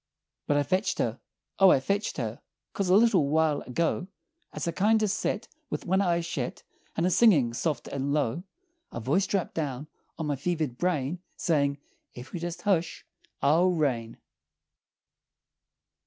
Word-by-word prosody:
"But 145 - +2
I 145 - +3
fetched 185 +8 0
her! - - -1 0.4
O 195 -1 +8
I 135 - +5
fetched 200 +10 -1
her! 115 -4 -4 0.3
'Cause 195 -2 -1
a 185 - +6
little 205 -9 +4
while 155 -1 +2
ago, 165 +7 -1 0.4
As - - -4
I - - +1
kindo' 215 +5 +3
set 210 +2 -1 0.2
With - - -4
one 190 +2 +2
eye 170 -3 +2
shet, 160 -7 -4 0.3
And 165 - +2
a 185 - +2
singin' 160 - +5
soft 150 +5 -2
and 140 0 -2
low, 145 0 0 0.5
A - - -5
voice 150 - +1
drapped 195 -4 -1
down 145 -2 -3 0.3
on 160 - -3
my 145 -1 0
fevered 155 -4 -2
brain 170 -2 0 0.2
Sayin', 140 -5 +1 0.4
'Ef 125 +5 -10
you'll 175 - -4
jest 175 0 -5
hush 175 -5 0 0.4
I'll 165 +6 +4
rain!'" 130 -10 -1
165 Hz, 155 wpm, -28 LUFS, 140-185 Hz, 0.5 s, O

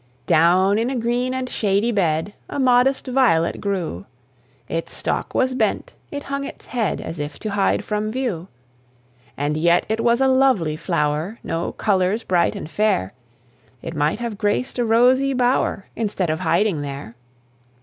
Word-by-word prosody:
Down 185 +5 +4
in 235 +2 0
a 270 - -2
green 245 +2 0
and 260 0 -2
shady 210 0 +1
bed 175 -2 0 0.2
A - - -5
modest 255 +1 +3
violet 245 -11 +2
grew; 180 - -3 0.6
Its 165 +1 -4
stalk - - -3
was 260 0 +2
bent, 255 - -1 0.2
it 285 0 -5
hung 275 0 -3
its - - -9
head, 230 -5 -1
As 165 - -6
if 145 0 -5
to 215 - -5
hide 200 -1 +1
from 210 0 -2
view. 220 -9 -3 0.9
And 145 +2 -1
yet 170 +3 +3
it 220 +1 0
was 235 +1 +3
a 270 - +4
lovely 260 - +3
flower, 155 +4 -1
No 165 +1 -3
colours 200 +2 +1
bright 175 -2 +1
and - - -6
fair; 195 - 0 0.7
It 165 0 -6
might 150 +4 +1
have 230 -3 -5
graced 215 +4 -1
a - - +3
rosy 255 +4 +4
bower, 245 -5 +1
Instead 200 -6 -1
of 160 - -2
hiding 175 -2 +1
there. 140 -5 -6
210 Hz, 160 wpm, -21 LUFS, 165-245 Hz, 0.9 s, Down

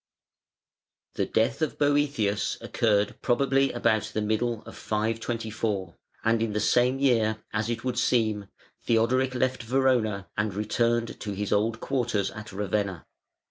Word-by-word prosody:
The - - -1
death 110 +8 +1
of 155 - -1
Boëthius 145 -8 +1
occurred 105 -2 0
probably 135 +2 +2
about 110 -3 +1
the 110 - +1
middle 110 +1 -1
of - - -11
524, 110 -3 -2 0.3
and 110 0 +2
in 115 -2 -1
the 105 - 0
same 125 +4 +3
year, 110 -5 +2
as 110 +1 -1
it 115 -1 -3
would 125 -1 -1
seem, 110 -4 +1 0.4
Theodoric 125 +3 +2
left 130 0 0
Verona 120 -5 +1
and 105 -2 -1
returned 115 +2 0
to 105 - -4
his 100 +1 -3
old 110 +2 +1
quarters 120 -7 0
at 105 0 -9
Ravenna. 100 -2 -2
115 Hz, 140 wpm, -27 LUFS, 105-125 Hz, 0.4 s, same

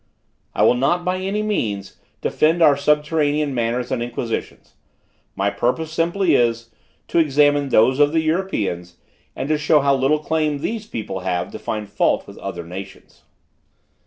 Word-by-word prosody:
"I - - +2
will - - +6
not, 140 +8 0
by 180 0 0
any 195 +3 -2
means, 105 - -2 0.2
defend 165 +2 +2
our 145 -3 +6
subterranean 150 0 +1
manners 120 +1 -1
and 130 -2 -1
institutions: 120 -1 -5 0.6
my 100 +1 0
purpose 125 +9 -1
simply 170 +1 +1
is, 115 -2 +1 0.4
to - - +2
examine 145 -2 +3
those 130 +3 +4
of 145 0 +5
the 160 0 +2
Europeans, 105 - -2 0.4
and 150 +2 -1
show 150 0 +4
how 140 0 +3
little 135 +3 +2
claim 155 -1 -1
these 215 +8 -4
people 105 - -5
have 90 -1 -2
to - - -8
find 105 -1 -4
fault - - +1
with - - -12
other 85 - -6
nations. 95 +3 -10
145 Hz, 155 wpm, -21 LUFS, 115-160 Hz, 0.6 s, will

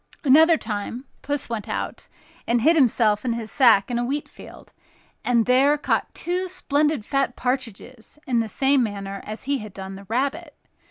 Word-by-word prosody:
Another 320 +4 +6
time, 220 +3 -5 0.2
Puss 285 -1 -3
went 230 -3 -5
out - - -4 0.4
and 235 0 +2
hid 325 +7 +4
himself 225 -7 +3
and 240 -2 -1
his 225 -3 -4
sack 230 -6 +4
in 240 - 0
a - - 0
wheat 280 +4 -3
field, - - -14 0.5
and 235 -2 +2
there 270 +4 +4
caught 295 - -1
two 360 +2 -2
splendid 300 - 0
fat 275 -1 0
partridges 250 -1 -5
in 245 -3 +1
the 225 - -1
same 270 +4 +2
manner 200 -3 -4
as 215 +1 -7
he 280 0 -1
had 210 -3 -10
done 190 0 -7
the 195 +1 -11
rabbit. 280 - -2
250 Hz, 175 wpm, -23 LUFS, 220-285 Hz, 0.5 s, Another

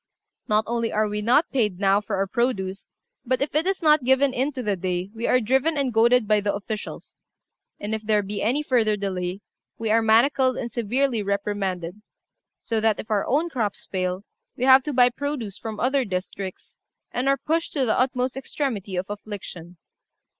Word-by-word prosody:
Not 215 +1 +3
only 230 0 -1
are 215 0 +1
we 210 0 -3
not 245 +9 +3
paid 210 -8 0
now 200 0 +3
for 210 -1 -3
our 195 +1 +1
produce, 195 -3 -2 0.3
but, 255 0 0
if 280 - -2
it 310 +4 +1
is 385 -2 -1
not 300 -3 +5
given 265 +1 +3
in 265 +4 0
to 255 -2 -4
the 205 -3 0
day, 180 +1 -3
we 230 +1 -3
are 250 - +4
driven 265 +7 +1
and 270 -4 0
goaded 235 +1 +4
by 210 -1 +3
the 205 0 -1
officials; 210 +1 -6 0.6
and 210 +2 -4
if 220 - -2
there 210 -1 +1
be 205 +1 -4
any 260 +8 +1
further 225 -6 +2
delay, 185 -1 -3 0.4
we 225 -1 -2
are 225 +1 +4
manacled 255 +4 +3
and 235 - -4
severely 240 +1 0
reprimanded; 200 -2 -2 0.6
so 225 -2 -1
that 220 -1 +2
if 220 - -7
our 205 -2 +1
own 300 +6 +2
crops 220 -7 -2
fail, 185 0 -2 0.3
we 245 - -3
have 260 +1 +7
to 300 - -2
buy 250 -1 +6
produce 255 -7 -4
from 220 -2 -6
other 265 +2 +2
districts, 190 -1 -6 0.3
and 255 +3 0
are 275 - +3
pushed 325 +3 -1
to 275 -4 +1
the 220 - +1
utmost 255 0 0
extremity 250 -8 -3
of 180 +1 -1
affliction. 200 -4 -8
220 Hz, 190 wpm, -24 LUFS, 200-260 Hz, 0.6 s, have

